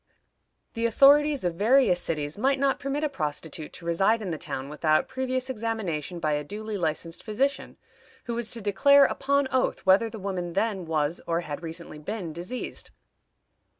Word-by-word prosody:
The 230 0 0
authorities 285 +4 +5
of 175 -1 0
various 210 -1 +3
cities 150 -2 -3
might 270 +6 +1
not 275 0 +1
permit 285 +1 -2
a - - +3
prostitute 155 - -4
to 170 - -10
reside 195 +7 +2
in 185 - -3
the 160 - -3
town 130 +1 -5
without 155 +1 +1
previous 260 0 -2
examination 210 - -3
by 155 -2 0
a 150 0 0
duly 215 +7 -6
licensed 165 -2 -2
physician, 265 +6 -2 0.5
who 240 - -4
was 235 -1 -1
to 230 - -3
declare, 275 +8 +5
upon 280 +1 +1
oath, 260 -4 0
whether 195 +4 +5
the 225 - -8
woman 185 -4 -4
then 195 -2 -1
was 155 0 -1
or 170 0 0
had 150 -2 -6
recently 165 -2 -7
been 180 0 -5
diseased. 180 +10 -6
200 Hz, 170 wpm, -26 LUFS, 165-255 Hz, 0.5 s, authorities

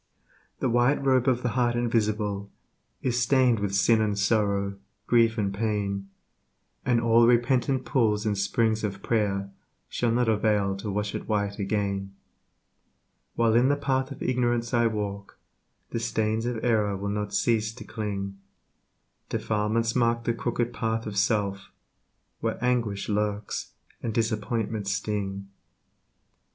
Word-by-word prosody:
The - - +2
White 125 +4 +2
Robe 130 -1 +3
of 125 -1 +2
the 125 - +1
Heart 120 0 +1
Invisible 105 -4 0 0.5
Is 125 -1 +1
stained 125 -2 +3
with 100 -1 -1
sin 110 +3 +4
and 105 -2 0
sorrow, 100 -1 +1 0.3
grief 115 -1 +3
and 100 -2 0
pain, 100 -2 -2 0.7
And 125 -2 +2
all 115 0 +5
repentant 125 +2 +2
pools 110 -5 +1
and 105 -1 +1
springs 110 +3 +1
of 100 -2 -3
prayer 100 -3 0 0.4
Shall 120 - 0
not 120 +1 +2
avail 105 -3 +2
to 105 +2 -5
wash 105 +1 -2
it - - -5
white 100 -1 -1
again. 100 -1 -2 1.2
While 115 -1 +3
in 120 +3 +4
the 145 - +3
path 135 -2 0
of 140 - -7
ignorance 120 -1 0
I 120 -1 +4
walk, 100 -2 -4 0.5
The 115 - -1
stains 110 0 0
of 120 -2 -3
error 105 -4 +2
will 100 +1 -3
not 105 0 -2
cease 110 +1 +1
to - - -9
cling 100 -3 -4 0.9
Defilements 110 +2 0
mark 115 -1 +2
the 115 - +1
crooked 120 +1 -2
path 115 0 -1
of 105 - -5
self, 100 -2 0 0.7
Where - - -2
anguish 120 -5 0
lurks 105 0 -2 0.3
and 115 - -2
disappointments 110 -2 -1
sting. 100 -2 -3
110 Hz, 140 wpm, -27 LUFS, 100-120 Hz, 1.2 s, all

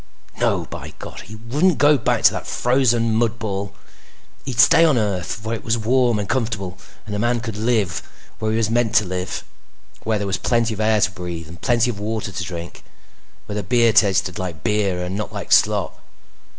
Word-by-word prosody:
No, - - +1
by - - -9
God! - - -9
He 105 +4 -10
wouldn't 140 +10 +1
go 145 +2 +5
back 125 - 0
to - - +7
that - - -6
frozen 120 -3 +2
mud 115 +1 +1
ball! 100 -3 -4 0.7
He'd 130 -3 -4
stay 165 +5 +7
on 155 -6 +4
Earth, 105 -2 -2
where 115 +1 -2
it 110 - -8
was 115 +1 +1
warm 120 +1 +2
and 105 -1 -3
comfortable 105 -7 -2 0.3
and 105 - -6
a 105 - -2
man 120 +2 +1
could 115 -2 -5
live 110 -5 0 0.4
where 110 - -1
he 110 - 0
was 115 -2 +2
meant 120 -1 +1
to 105 - +5
live. 90 0 -4 0.6
Where 110 -1 0
there 100 - -3
was 95 -1 -1
plenty 115 -2 +1
of 105 - -8
air 110 -1 +3
to 100 - +2
breathe 85 -3 -6
and 85 +2 -12
plenty 120 0 +2
of 100 - -9
water 110 0 -3
to 90 - -4
drink. 85 0 -7 0.6
Where 105 - -6
the 105 - -1
beer 115 +3 +3
tasted 95 -4 +3
like 85 -5 -5
beer 100 -4 0
and 90 +2 -4
not 105 +1 -4
like - - -6
slop. - - +3
110 Hz, 205 wpm, -21 LUFS, 95-120 Hz, 0.7 s, to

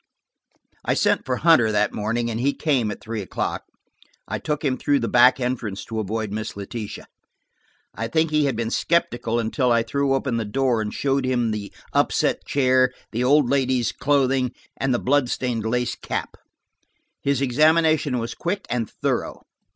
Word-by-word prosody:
I - - +1
sent - - +1
for 130 - +1
Hunter 130 -7 +4
that 105 0 +1
morning 115 +3 -1
and 115 - -3
he 140 +3 +1
came 130 -8 +1
at 105 - -6
three 110 -1 -4
o'clock. 95 - -3 0.6
I - - -3
took 150 0 -3
him 130 -2 +2
through 145 +2 +1
the 115 -4 -1
back 125 +2 +5
entrance 120 -6 -3
to 110 -1 -4
avoid 110 0 -3
Miss 105 -1 -5
Letitia. 105 +1 -6 0.9
I 115 - -3
think 160 +6 +1
he 150 -1 +3
had 135 -4 0
been 115 0 -2
skeptical 120 -9 0
until 120 +3 0
I 115 -1 +3
threw 140 +3 0
open 130 -3 -1
the 115 - -1
door 120 +1 0
and 105 -1 -3
showed 135 -1 0
him 120 -3 0
the 105 -2 -5 0.2
upset - - +1
chair, 130 -2 +3 0.2
the 120 +2 -1
old 140 +1 +4
lady's 130 -2 +1
clothing, 130 -2 +1 0.2
and 135 - -1
the 120 - +2
blood 135 0 +1
stained 120 -4 -2
lace 125 +1 0
cap. - - -5 0.9
His 140 -2 +1
examination 155 +1 +3
was 115 -1 -3
quick 185 +4 -3
and 120 -3 -1
thorough. - - -3
125 Hz, 175 wpm, -23 LUFS, 115-140 Hz, 0.9 s, back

